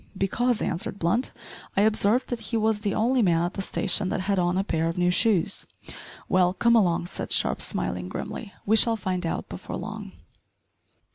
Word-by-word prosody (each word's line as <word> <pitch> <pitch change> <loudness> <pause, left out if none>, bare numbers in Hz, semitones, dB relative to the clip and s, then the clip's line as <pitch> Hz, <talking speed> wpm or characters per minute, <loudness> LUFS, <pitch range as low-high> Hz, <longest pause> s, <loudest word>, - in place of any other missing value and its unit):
"Because," 235 +5 0
answered 180 +2 -3
Blunt, 200 +9 +1 0.5
"I - - +5
observed 215 +3 +3
that 245 - -3
he 230 - 0
was 220 -1 +1
the 205 -2 -2
only 245 +4 +2
man 170 -5 +2
at 175 - -2
the 195 - -4
station 190 -1 +1
that 185 - -2
had 195 0 0
on 175 +1 +1
a 190 - +1
pair 165 -4 -1
of 165 - -5
new 180 0 +2
shoes!" 200 -2 +2 0.6
"Well, 180 -1 +3
come 235 +3 +3
along," 175 -6 +2
said - - -6
Sharp, - - +2
smiling 90 0 -2
grimly, 210 - -6
"we 220 - +3
shall 230 0 +5
find 185 -4 -2
out - - -3
before - - -7
long." - - -7
195 Hz, 190 wpm, -25 LUFS, 175-220 Hz, 0.6 s, I